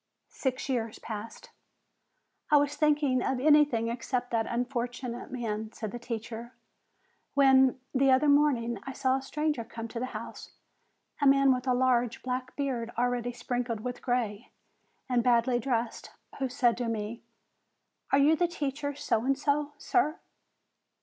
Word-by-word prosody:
Six 260 -1 -3
years 230 -5 -2
passed. 220 0 -8 1.0
"I 300 - +6
was 290 0 +1
thinking 295 -4 +2
of 265 0 -1
anything 290 -5 +4
except 245 +1 -2
that 225 -1 0
unfortunate 245 0 -3
man/' 220 -3 -3
said 215 -3 -5
the 240 - -6
teacher, 235 0 -6 0.8
"when, 265 -2 +5
the 270 0 +3
other 260 +3 +4
morning, 270 -6 +3
I 270 - -7
saw 260 0 +1
a - - -5
stranger 300 -2 -2
come 230 0 -7
to 230 - -5
the 255 - -2
house, - - -9 0.7
a 285 - +4
man 275 -1 +6
with 250 +1 -4
a 250 - +3
large, 245 -2 +1
black 255 0 -3
beard 255 -5 -2
already 245 0 0
sprinkled 245 -2 -3
with 245 +1 -5
gray, 240 -3 -2 0.6
and 250 -2 +2
badly 240 0 +3
dressed, 235 -1 -2 0.3
who 265 -1 -1
said 245 -2 +2
to 240 -1 -2
me: 225 0 -3 0.9
'Are - - +5
you 290 +3 +5
the 350 +2 +2
teacher 285 -3 -3
So 230 -5 0
and 270 +1 +1
So, 290 +1 0
sir?' 315 0 +1
250 Hz, 150 wpm, -29 LUFS, 235-275 Hz, 1.0 s, I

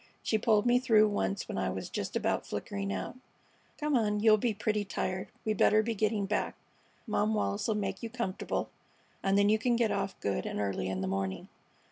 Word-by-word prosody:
She 220 - +1
pulled 215 0 +3
me 245 0 +5
through 220 -4 +5
once 95 - -1
when - - -3
I - - 0
was - - -4
just - - -4
about - - 0
flickering 100 0 -3
out. 95 - -4 0.6
Come 300 -1 +1
on. 210 -3 +2
You'll 215 0 +6
be 235 +2 +1
pretty 210 0 -1
tired. 185 -1 -3 0.2
We 215 - +2
better 215 +1 +4
be 230 +1 -1
getting 215 -1 0
back. 210 +2 -1 0.5
Mom 215 -1 +1
Wallis 205 -1 -1
'll 220 - +2
make 195 -2 -2
you 230 - -4
comfortable, 230 -5 -3 0.5
and 195 0 +2
then 200 0 +4
you 215 +1 +4
can 240 +1 +2
get 230 -2 +2
off 195 - -2
good 100 -1 -1
and - - -3
early 95 -2 -1
in 95 0 -2
the 95 - -1
morning." 95 0 -3
210 Hz, 205 wpm, -31 LUFS, 185-220 Hz, 0.6 s, You'll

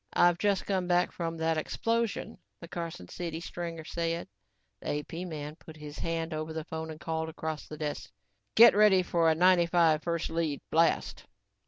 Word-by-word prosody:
"I've 175 0 +4
just 200 -1 +1
come 185 -3 0
back 175 0 +2
from 165 -1 -4
that 160 0 +1
explosion," 230 +6 -2 0.2
the 170 - -9
Carson 165 - -6
City 165 - -5
stringer 170 -1 -6
said. 165 +1 -2 0.5
The 145 - -2
AP - - -15
man 150 -2 -6
put 160 -2 -13
his 150 -1 -9
hand 165 0 -2
over 155 +1 -4
the 160 0 -4
phone 160 0 -5
and 155 -1 -8
called 160 -1 -3
across 160 -1 -5
the 155 - -8
desk. 150 -1 -4 0.5
"Get 235 +1 +9
ready 205 -3 +6
for 170 -2 +2
a 160 - +3
'95' 170 -2 +4
first 170 -1 -2
lead 160 -4 -1
blast." 165 0 +2
165 Hz, 175 wpm, -30 LUFS, 160-175 Hz, 0.5 s, Get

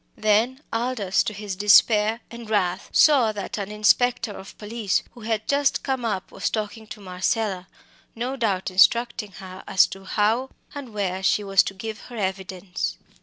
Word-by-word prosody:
Then 220 +6 +2
Aldous, 225 -5 0
to - - -2
his 205 -2 -6
despair 210 +3 +4
and 235 -2 -9
wrath, 190 -3 0
saw 270 -8 +5
that 205 +1 -5
an 200 -1 -4
inspector 235 +2 +2
of 195 -1 -11
police, 215 -2 -1
who 240 - -15
had 220 -1 -2
just 280 -1 +1
come 265 -3 -2
up, 195 -4 -3
was - - -2
talking 220 0 -4
to 210 - -9
Marcella, 190 0 -2 0.5
no 245 +4 -3
doubt 200 -7 -1
instructing 215 +2 +3
her 185 0 -10
as 190 - +5
to 195 0 -10
how 225 +7 +1 0.2
and 280 -5 -8
where 190 -2 -2
she 200 +2 +2
was 195 -1 +4
to 195 - -5
give 215 +2 -6
her 240 - -8
evidence. 190 - -3
210 Hz, 170 wpm, -24 LUFS, 195-235 Hz, 0.5 s, saw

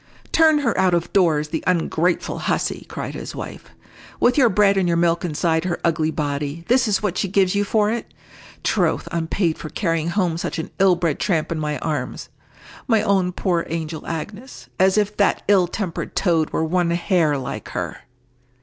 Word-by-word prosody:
"Turn 320 -1 +5
her 235 -5 0
out 185 -2 +3
of 170 0 -2
doors, 160 -6 +2
the 160 - -3
ungrateful 175 -1 0
hussy!" - - -2
cried - - -5
his - - -7
wife. - - -7 0.5
"With 245 +1 +3
your 260 -5 +5
bread 200 0 +4
and 190 -2 +1
your 170 -1 +2
milk 170 0 +2
inside 160 0 0
her 175 -2 -2
ugly 160 -2 +1
body, 145 +1 -3
this 250 0 +3
is 210 0 0
what 190 -3 -1
she - - 0
gives 190 -1 +2
you 200 0 +1
for 210 +1 +1
it! 235 0 -4 0.5
Troth, - - +1
I'm 165 -1 -2
paid 170 -3 0
for 155 - -6
carrying 165 -4 -1
home 170 -3 0
such - - -3
an 160 - -5
ill 190 -2 +5
bred 170 -4 -1
tramp 165 -6 0
in 165 - -2
my 150 -1 -2
arms! 150 -6 -4 0.6
My 225 -4 +3
own 190 -3 +2
poor 175 -2 0
angel 160 -1 -4
Agnes! 205 +10 -7
As 190 +2 +4
if 210 0 +1
that 200 - +2
ill 195 -3 +4
tempered 180 -2 -4
toad 165 -5 +2
were - - -1
one 175 +1 +1
hair 170 -3 +1
like 130 - -6
her!" - - -3
175 Hz, 190 wpm, -21 LUFS, 160-200 Hz, 0.6 s, Turn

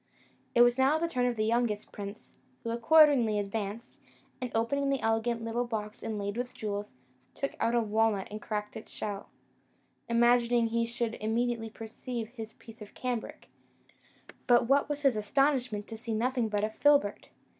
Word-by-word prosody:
It 240 - +6
was 240 +1 +3
now 270 +4 +4
the 335 +1 0
turn 250 -6 0
of 245 - 0
the 215 -1 0
youngest 225 -2 0
prince, 200 +1 -9 0.2
who 230 - -2
accordingly 240 -2 +5
advanced, 205 +2 -4 0.4
and 250 - -2
opening 275 +5 +1
an 275 - +1
elegant 225 +1 0
little 230 +2 -1
box 215 -2 -4
inlaid 205 -1 -3
with 245 +1 -4
jewels, 205 -5 -4 0.4
took 275 - -2
out 230 +1 +1
a 235 - +4
walnut 220 -2 +1
and 215 0 -6
cracked 210 -1 -4
the 220 - -7
shell, 205 -1 -5 0.8
imagining 235 0 +3
he 230 0 0
should 235 -1 -2
immediately 225 +1 0
perceive 225 +1 -6
his 225 -3 -8
piece 225 0 -15
of 210 - -11
cambric; 245 -3 -4 1.0
but 240 -1 +5
what 280 +3 +3
was 295 0 -3
his 275 -5 +3
astonishment 245 -1 +1
to 225 - -7
see 225 0 -4
nothing 245 0 0
but 205 -1 -1
a 215 - 0
filbert! 285 -4 +2
230 Hz, 165 wpm, -30 LUFS, 215-245 Hz, 1.0 s, It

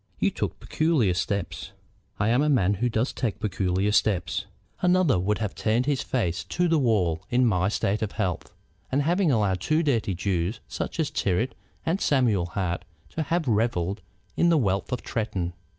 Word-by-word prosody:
"You - - +2
took - - -3
peculiar 155 - +1
steps." 100 +1 -3 0.5
"I 100 +2 +2
am 120 +4 +3
a 150 - +2
man 105 -9 +3
who 120 +5 0
does 115 +3 0
take 120 -6 -2
peculiar 95 -2 0
steps. 100 -4 +1 0.3
Another 180 - +3
would 105 +4 0
have 105 -3 -3
turned 115 +3 +1
his 145 -2 +1
face 90 -9 -1
to 180 0 0
the 165 -2 +3
wall 95 - +1
in 125 +1 +3
my 95 -4 +2
state 105 0 0
of 110 -2 -2
health, 95 -6 -2 0.4
and 140 +2 +2
have 175 +5 +1
allowed 110 - +2
two 155 - +1
dirty 115 - +1
Jews 90 +2 -1
such - - -5
as 155 - 0
Tyrrwhit 105 +7 0 0.3
and 170 +5 0
Samuel 115 -11 +2
Hart 90 0 -2 0.3
to 160 - -3
have 160 +1 -1
revelled 105 -4 0 0.3
in 170 - +3
the 165 - +4
wealth 100 -7 0
of 125 - -2
Tretton. 100 -6 -2
110 Hz, 180 wpm, -26 LUFS, 95-140 Hz, 0.5 s, the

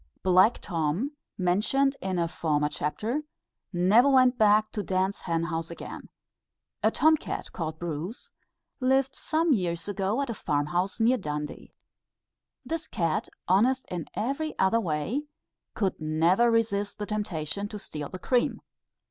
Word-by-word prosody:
Black 185 +5 +5
Tom, 170 - -1 0.3
mentioned 215 +10 +2
in 190 -1 -2
a 170 -1 +1
former 150 -3 0
chapter, 210 - -2 0.5
never 200 +9 +5
went 255 -2 +5
back 215 -1 +4
to 210 - -3
Dan's 190 0 0
hen 165 -1 -1
house 165 -1 -3
again. 170 - -8 0.7
A - - +4
Tom 315 0 +4
cat, - - -5
called 160 -2 -4
Bruce, 175 +6 -5 0.5
lived 265 +1 +2
some 320 0 +1
years 175 -6 -1
ago, 205 +3 -1
at 280 -2 -1
a - - -2
farm 145 -8 -1
house 185 +5 0
near 240 +3 +3
Dundee. 150 -4 -5 0.9
This 320 -1 -3
cat 165 -3 -1 0.2
honest 245 +8 +3
in 175 -3 -4
every 275 +7 -2
other 190 +4 +3
way 200 - -2 0.5
could 190 -6 -1
never 165 +9 +3
resist 210 -3 0
the 210 - -3
temptation 200 -3 -3
to 210 - -7
steal 150 -7 -6
the 185 - -6
cream. 245 +6 +1
200 Hz, 145 wpm, -27 LUFS, 170-240 Hz, 0.9 s, Black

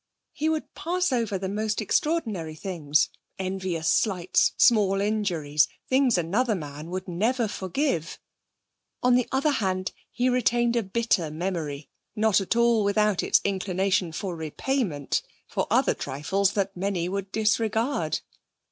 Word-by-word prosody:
He 310 +2 -1
would 315 -1 -2
pass 360 0 -1
over 230 -6 0
the 190 0 -4
most 210 +2 -1
extraordinary 215 - -1
things 155 -4 0 0.3
envious 185 -4 -2
slights, 185 0 +2
small 205 -5 +4
injuries, 175 -9 +1 0.2
things 260 -4 +3
another 210 +8 +1
man 150 -1 -7
would 185 +2 -4
never 225 +7 0
forgive. 190 - -2 0.9
On 250 0 +5
the 250 -1 +3
other 275 +3 +2
hand, 185 -7 -1 0.2
he 250 0 0
retained 240 -1 +2
a 235 - +3
bitter 195 -5 0
memory, 155 -3 -4 0.3
not 215 -2 +3
at 195 - -1
all 235 -2 +4
without 205 -1 +2
its - - +3
inclination 190 -1 0
for 180 +2 -4
repayment, 160 - -1 0.3
for - - -2
other - - +3
trifles 190 +9 -1
that 195 -1 -1
many 185 -2 -1
would 195 +1 -4
disregard. 220 +4 0
195 Hz, 135 wpm, -26 LUFS, 175-235 Hz, 0.9 s, On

